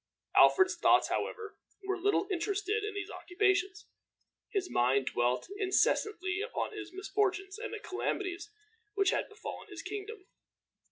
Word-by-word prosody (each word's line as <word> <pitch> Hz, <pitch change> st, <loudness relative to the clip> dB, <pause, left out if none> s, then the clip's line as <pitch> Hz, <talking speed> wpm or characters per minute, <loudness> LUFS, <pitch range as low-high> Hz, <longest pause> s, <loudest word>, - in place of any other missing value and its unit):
Alfred's 380 Hz, -1 st, +6 dB
thoughts, -, -, +4 dB
however, 435 Hz, -2 st, -3 dB, 0.3 s
were 385 Hz, 0 st, -1 dB
little 405 Hz, 0 st, +2 dB
interested 405 Hz, +4 st, -1 dB
in 420 Hz, 0 st, -4 dB
these 410 Hz, +1 st, -4 dB
occupations. 385 Hz, +2 st, 0 dB, 0.6 s
His 390 Hz, -3 st, -1 dB
mind 130 Hz, -, +2 dB
dwelt 120 Hz, +1 st, +1 dB
incessantly 375 Hz, -1 st, +1 dB
upon 470 Hz, 0 st, -3 dB
his 395 Hz, -4 st, -7 dB
misfortunes 390 Hz, +1 st, -1 dB
and 485 Hz, -, -5 dB
the 435 Hz, -, -5 dB
calamities 375 Hz, -1 st, -3 dB, 0.5 s
which 395 Hz, -1 st, +3 dB
had -, -, -1 dB
befallen 430 Hz, +1 st, -8 dB
his 360 Hz, -5 st, -8 dB
kingdom. 410 Hz, +1 st, -6 dB
390 Hz, 130 wpm, -32 LUFS, 365-415 Hz, 0.6 s, Alfred's